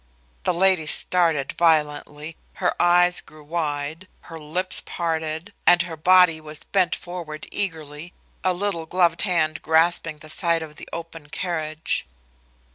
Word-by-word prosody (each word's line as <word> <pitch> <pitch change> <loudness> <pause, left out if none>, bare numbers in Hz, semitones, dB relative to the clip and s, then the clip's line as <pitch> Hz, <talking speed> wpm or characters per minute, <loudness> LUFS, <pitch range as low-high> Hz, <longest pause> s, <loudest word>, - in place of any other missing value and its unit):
The - - +2
lady 185 -3 +2
started 165 -5 +2
violently, 155 -1 0 0.2
her - - 0
eyes 175 0 +4
grew 155 0 -16
wide, 155 +2 -3
her 165 -1 -10
lips 175 +5 +2
parted, 160 +3 -3
and 175 0 +6
her 165 - -7
body 175 0 +5
was 155 0 -4
bent 185 -3 +1
forward 170 -4 -8
eagerly, 160 -3 -5 0.3
a 185 - +2
little 180 -3 -3
gloved 175 -1 +2
hand 160 -5 0
grasping 160 0 +2
the 155 +1 -14
side 165 -1 +1
of 150 -1 -11
the - - -11
open 165 -3 -8
carriage. 160 -3 -3
165 Hz, 135 wpm, -23 LUFS, 155-175 Hz, 0.3 s, and